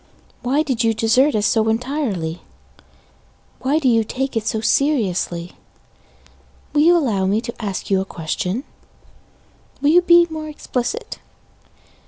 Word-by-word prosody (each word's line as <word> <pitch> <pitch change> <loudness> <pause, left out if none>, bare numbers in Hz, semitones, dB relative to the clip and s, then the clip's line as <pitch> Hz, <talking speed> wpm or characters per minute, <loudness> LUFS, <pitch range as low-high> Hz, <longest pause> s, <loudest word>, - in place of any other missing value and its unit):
Why 275 +5 +1
did 260 -6 -1
you 225 -1 +2
desert 240 +5 +3
us 210 -1 +1
so 220 0 +2
entirely? 225 - -2 1.2
Why 275 +4 +1
do 305 -4 0
you 230 -2 +4
take 265 +4 -3
it 225 -1 -1
so 220 - 0
seriously? 195 - 0 1.2
Will 295 - +3
you 345 +3 +6
allow 210 - 0
me 205 +3 +2
to 235 -1 -7
ask 200 -1 -4
you 190 -1 +3
a - - -1
question? 180 - -3 1.2
Will 290 +1 +3
you 350 +2 +6
be 345 -1 +6
more 310 -1 -5
explicit? 250 -5 -4
235 Hz, 140 wpm, -20 LUFS, 210-290 Hz, 1.2 s, you